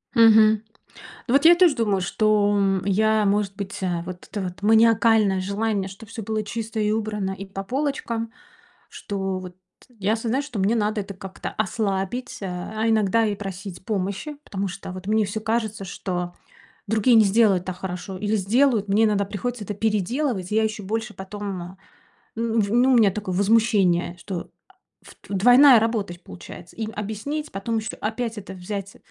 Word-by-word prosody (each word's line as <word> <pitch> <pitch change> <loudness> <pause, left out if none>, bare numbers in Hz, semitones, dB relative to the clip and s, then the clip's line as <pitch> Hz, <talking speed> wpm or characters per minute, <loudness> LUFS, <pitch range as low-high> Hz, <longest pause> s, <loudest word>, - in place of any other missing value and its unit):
Мгм. 220 -1 +6 0.6
Ну 240 - 0
вот, 280 +3 +4
я 345 +1 +9
тоже 345 -5 +5
думаю, 205 -5 +1
что, 205 +2 +2
м, 195 -2 +1
я, 215 +2 +2
может 200 -1 +1
быть 200 -1 -6 0.3
Вот 180 0 -8
это 205 -1 -3
вот 180 +1 -6
маниакальное 220 -2 +4
желание, 200 0 -1
чтобы 200 +3 -12
всё 225 -2 -6
было 215 0 -2
чисто 225 +1 -4
и 210 0 +1
убрано, 210 -3 -2
и 195 +1 -7
по 195 0 -6
полочкам, 235 -2 -2 0.6
что, 195 -2 -4
вот, 180 -1 -9 0.4
я 205 +3 +1
осознаю, 235 +5 -1
что 260 -8 -7
мне 200 +4 +2
надо 210 -1 0
это 200 0 -8
как-то 190 0 -7
ослабить, 200 +4 -2
э, 195 - -4
а 215 +5 -3
иногда 220 0 +3
и 205 - 0
просить 190 -2 -7
помощи. 200 +8 -3
Потому 200 0 -3
что, 190 +1 -8
вот, 185 +1 -9
мне 215 0 +2
всё 215 +2 -4
кажется, 220 -2 -2
что 180 -1 -4 0.5
другие 220 +3 +3
не 220 - +7
сделают 200 -3 +3
так 185 -1 -5
хорошо 185 +1 -5
или 210 +2 0
сделают, 220 +1 +2
мне 215 +3 +3
иногда 205 -2 +2
приходится 220 +2 -4
это 210 - -4
переделывать, 215 0 -1
и - - 0
я 220 - +4
еще 215 -1 -3
больше 220 +2 -3
потом, 190 -2 -6 0.6
ну, 230 0 0
в 200 0 0
ну, 250 +3 +4
у - - +5
меня 210 -4 +5
такое 190 -2 -4
возмущение, 195 -4 +2
что, 175 0 -6 0.5
ф - - -15
двойная 245 +5 +7
работа, 225 -2 0
то 175 - -7
есть, 175 - -16
получается. 90 - -11
Им 220 -1 -4
объяснить, 220 +9 -4
потом 225 +4 -2
еще 220 - -4
опять 225 +1 -3
это 195 - -8
взять, 195 +2 -6
210 Hz, 175 wpm, -23 LUFS, 195-225 Hz, 0.6 s, я